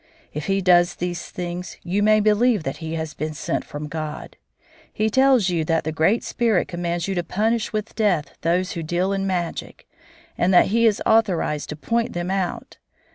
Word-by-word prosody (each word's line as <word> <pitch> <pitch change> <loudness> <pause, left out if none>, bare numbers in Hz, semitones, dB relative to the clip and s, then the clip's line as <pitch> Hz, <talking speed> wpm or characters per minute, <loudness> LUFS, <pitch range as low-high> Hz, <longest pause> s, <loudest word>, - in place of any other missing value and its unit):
If 150 +1 -5
he 195 0 +1
does 175 -1 +4
these 175 -1 -4
things 180 0 -6
you 190 +4 0
may 215 +1 +4
believe 215 -1 +3
that 135 - -4
he 160 -1 -5
has 160 -1 -4
been 155 0 -4
sent - - -2
from 150 +1 -7
God. 155 0 -6 0.6
He 215 +1 0
tells 260 -5 +4
you 170 -3 0
that 165 +1 +1
the 155 - -2
Great 160 +9 +2
Spirit 225 -6 +1
commands 175 -1 -3
you 195 - -1
to 175 -2 -1
punish 220 +6 0
with 215 0 -3
death 190 -9 0
those 180 +3 +1
who 170 - -4
deal 175 +4 0
in 195 0 -1
magic, 175 -3 -4 0.5
and 180 - +3
that 175 - +6
he 230 +2 +4
is 210 -2 +1
authorized 185 -9 +1
to 150 - -4
point 230 +9 -1
them 175 +1 -3
out. 190 -2 -3
180 Hz, 190 wpm, -22 LUFS, 165-210 Hz, 0.6 s, that